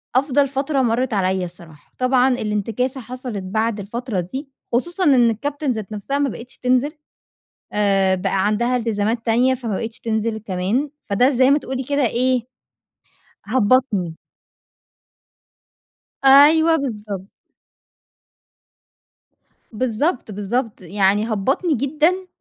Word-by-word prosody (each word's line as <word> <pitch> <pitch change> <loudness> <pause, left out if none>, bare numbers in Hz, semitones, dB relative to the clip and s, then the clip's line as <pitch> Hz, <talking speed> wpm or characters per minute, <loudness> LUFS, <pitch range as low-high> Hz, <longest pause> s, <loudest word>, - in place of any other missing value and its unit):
أفضل 280 +1 +3
فترة 275 +1 -1
مرّت 240 0 0
عليَّ 190 -2 0
الصراحة. 170 -4 -14
طبعًا 255 0 +3
الانتكاسة 225 +4 -2
حصلت 245 -4 -6
بعد 220 +3 -1
الفترة 220 +1 -4
دي 265 - -5 0.2
خصوصًا 345 +10 0
إن 255 -7 +5
الكابتن 285 +5 -2
ذات 220 -4 -5
نفسها 215 +7 -3
ما 285 -1 +1
بقتش 245 +2 -10
تنزل 255 +3 +1 0.8
آآ، 195 -2 +2
بقى 190 +1 0
عندها 235 +4 +1
إلتزامات 230 0 -1
تانية 245 +3 +3
فما 235 -5 -4
بقيتش 225 +2 -5
تنزل 220 0 -1
كمان، 210 +8 -2 0.2
فده 245 +7 +4
زي 260 0 +3
ما 285 - +5
تقولي 265 -2 -5
كده 285 0 +1
إيه، 250 +2 +1 1.0
هبَّطني. 215 -7 +1 2.1
أيوه 310 +4 +7
بالضبط. 210 - -4 2.5
بالضبط، 245 +4 -1
بالضبط، 210 +4 -3
يعني 200 +4 +1
هبَّطني 270 - 0
جدًا 310 +8 +1
235 Hz, 110 wpm, -21 LUFS, 205-265 Hz, 2.5 s, أيوه